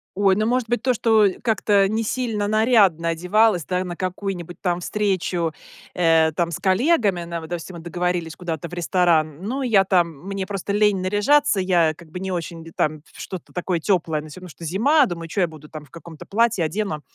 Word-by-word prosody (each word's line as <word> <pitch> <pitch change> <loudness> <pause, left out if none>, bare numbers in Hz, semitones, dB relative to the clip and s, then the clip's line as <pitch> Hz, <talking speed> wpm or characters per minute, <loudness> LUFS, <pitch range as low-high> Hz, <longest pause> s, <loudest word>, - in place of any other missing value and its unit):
Ой, 195 -1 +3
ну, 215 +2 0
может 250 0 0
быть, 240 0 -1
то, 255 0 +2
что 220 -3 +4 0.2
как-то 205 -4 +2
несильно 220 0 -1
нарядно 210 -7 +3
одевалась, 180 +3 +2
да, 180 0 -1
на 175 -1 -6
какую-нибудь 185 -2 -5
там 175 -2 -1
встречу, 180 -4 -1 0.4
э, 165 -2 +3
там 170 0 0
с 160 - -3
коллегами, 200 - +2
на 170 0 -5
вот 160 -1 -10
допустим, 175 +1 -6
мы - - -9
договорились 175 -1 -2
куда-то 170 -2 -5
в - - -14
ресторан, 170 -3 +1
ну 255 +7 -3
я 225 -7 +4
там 180 -2 +3 0.2
мне 195 -1 -3
просто 200 0 -3
лень 210 -1 +3
наряжаться, 210 +6 +2
я 175 -4 +2
как 160 +1 -16
бы 180 +3 -7
не 190 0 -4
очень 170 -2 -5
д 165 - -12
там 155 0 -1
в - - -11
что-то 185 -3 -8
такое 180 -1 -1
теплое, 165 -4 0
ну 155 - -11
всё 150 - -10
равно 180 - -10
что 165 +1 -10
зима, 270 - +3
думаю: 170 -6 -6
"Чё 195 - -1
я 175 - +3
буду 155 -2 -13
там 155 -2 -9
в - - -26
каком-то 165 -1 -11
платье, 225 -3 +1
одену 160 -2 -3
185 Hz, 205 wpm, -22 LUFS, 170-210 Hz, 0.4 s, что